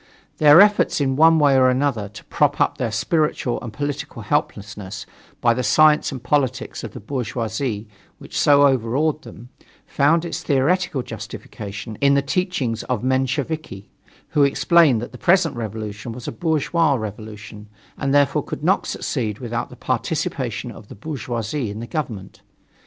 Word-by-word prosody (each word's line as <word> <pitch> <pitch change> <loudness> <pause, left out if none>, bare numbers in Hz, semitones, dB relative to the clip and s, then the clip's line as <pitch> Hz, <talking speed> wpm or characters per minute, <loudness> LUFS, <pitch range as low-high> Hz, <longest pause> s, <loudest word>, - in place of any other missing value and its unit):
Their 150 +3 +8
efforts 205 -4 +3
in 135 -2 +1
one 160 +3 +6
way 145 -3 +4
or 130 -1 +5
another 125 -6 0
to 105 - -12
prop - - 0
up - - +1
their 120 -3 -1
spiritual 125 +3 0
and 120 - -7
political 145 -4 -5
helplessness 105 -6 -3 0.4
by 120 - +4
the 125 - -2
science 155 +4 +4
and 130 -3 -7
politics 130 -3 -1
of - - -7
the 125 - -8
bourgeoisie 115 -1 -3 0.3
which - - -12
so 145 -1 +5
overawed 135 +4 +1
them, 120 -3 -12 0.4
found 160 +4 +2
its 170 - -4
theoretical 145 0 +1
justification 110 -1 -8
in 140 0 +4
the 140 - +2
teachings 140 - -1
of 125 -4 -2
the - - 0
Mensheviki, 130 -5 -2 0.4
who 150 - +1
explained 140 -3 +4
that 120 - -7
the 125 - -12
present 175 -4 +3
revolution 110 0 -5
was 120 0 -9
a - - -2
bourgeois 160 +2 +1
revolution, 105 -1 -8 0.3
and 140 -1 -2
therefore 145 -1 +3
could - - -7
not - - +2
succeed 105 -4 -3
without 120 0 -4
the - - -12
participation - - -2
of - - -13
the - - -11
bourgeoisie 120 -1 -4
in 105 +2 -6
the 115 - -5
government. 115 - -5
130 Hz, 160 wpm, -21 LUFS, 110-150 Hz, 0.4 s, Their